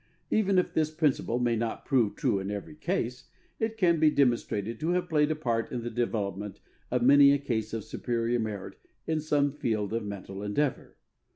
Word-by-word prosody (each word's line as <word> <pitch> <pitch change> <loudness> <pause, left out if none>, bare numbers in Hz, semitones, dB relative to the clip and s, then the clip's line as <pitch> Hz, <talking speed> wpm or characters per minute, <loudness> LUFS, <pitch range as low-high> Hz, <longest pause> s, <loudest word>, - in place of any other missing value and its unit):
Even 200 -3 +3
if 180 - +1
this 155 -1 +2
principle 155 -6 0
may 120 -1 +1
not 115 0 -3
prove 120 -7 +2
true 100 - +1
in 95 +1 -4
every 105 +8 -5
case, 150 -7 -3 0.3
it 220 0 -1
can 170 -5 +3
be 155 0 +6
demonstrated 120 -6 0
to 160 +2 -1
have 180 0 0
played 150 -3 +2
a 155 - 0
part 120 -6 -1
in 120 -2 -3
the 120 - -4
development 105 -4 -2 0.3
of 125 -1 0
many 140 +2 +7
a - - +3
case 115 -6 -2
of 115 -2 -3
superior 120 +1 -1
merit 105 -4 -5 0.3
in 160 -1 0
some 145 -2 +1
field 110 -7 -2
of 115 -1 -1
mental 100 -1 -7
endeavour. 120 +7 -2
120 Hz, 190 wpm, -28 LUFS, 110-150 Hz, 0.3 s, many